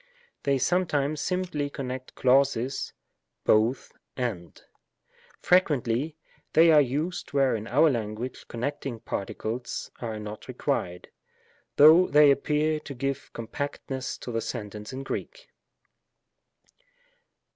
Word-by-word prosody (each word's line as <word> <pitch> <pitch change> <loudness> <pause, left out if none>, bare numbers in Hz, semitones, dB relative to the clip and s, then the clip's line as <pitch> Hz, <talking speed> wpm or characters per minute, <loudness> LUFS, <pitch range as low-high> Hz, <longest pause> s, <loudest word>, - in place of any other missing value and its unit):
They 140 -1 +1
sometimes 150 -2 +1
simply 180 -6 -1
con 135 -2 -5
nect 130 0 -7
clauses 135 0 +2 0.5
=:J(9<A 110 +5 +2
— - - -51
and; 85 -4 -13 0.8
frequently 150 -4 +2 0.4
they 165 +1 +7
are 150 -2 +7
used 145 +8 -2
where 135 -3 +3
in 110 0 -5
our 145 +7 +4
language 115 -1 -3
connecting 125 0 -4
particles 115 +2 -4
are 115 -3 -4
not 105 0 -8
re - - -7
quired, 90 0 -2 0.7
though 160 +5 +8
they 150 0 +6
appear 150 +2 +1
to 140 -2 -9
give 135 +2 -3
compactness 130 +2 -5
to 125 - -5
the 115 -1 -1
sentence 105 -3 -6
in 135 +1 -6
Greek. - - -6
135 Hz, 115 wpm, -27 LUFS, 115-150 Hz, 0.8 s, though